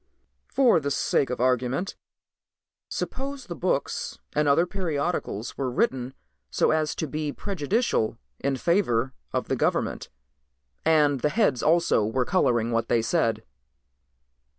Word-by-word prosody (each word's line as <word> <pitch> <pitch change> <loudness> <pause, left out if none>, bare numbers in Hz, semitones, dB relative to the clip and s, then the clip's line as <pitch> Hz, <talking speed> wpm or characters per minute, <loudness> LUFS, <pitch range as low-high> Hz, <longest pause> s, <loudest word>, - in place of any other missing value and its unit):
"For 255 -9 +4
the 140 -2 -2
sake 140 -1 +1
of 125 - -3
argument 130 - 0 0.9
suppose 275 0 -4
the 175 - -6
books 170 -6 -1 0.2
and 150 0 +2
other 145 +5 +4
periodicals 165 - -3
were 135 -2 0
written 130 +1 -1 0.3
so - - +2
as 155 -1 0
to 160 - -2
be 150 0 -3
prejudicial 190 - -1 0.2
in 140 0 0
favor 130 - +1 0.2
of - - -2
the - - 0
government, - - -1 0.7
and 150 -3 +3
the 150 - +1
heads 150 - +2
also 170 -7 +3
were 125 +4 0
coloring 120 -10 +2
what 115 0 0
they 115 -2 +2
said." 115 -4 +1
145 Hz, 130 wpm, -26 LUFS, 125-175 Hz, 0.9 s, For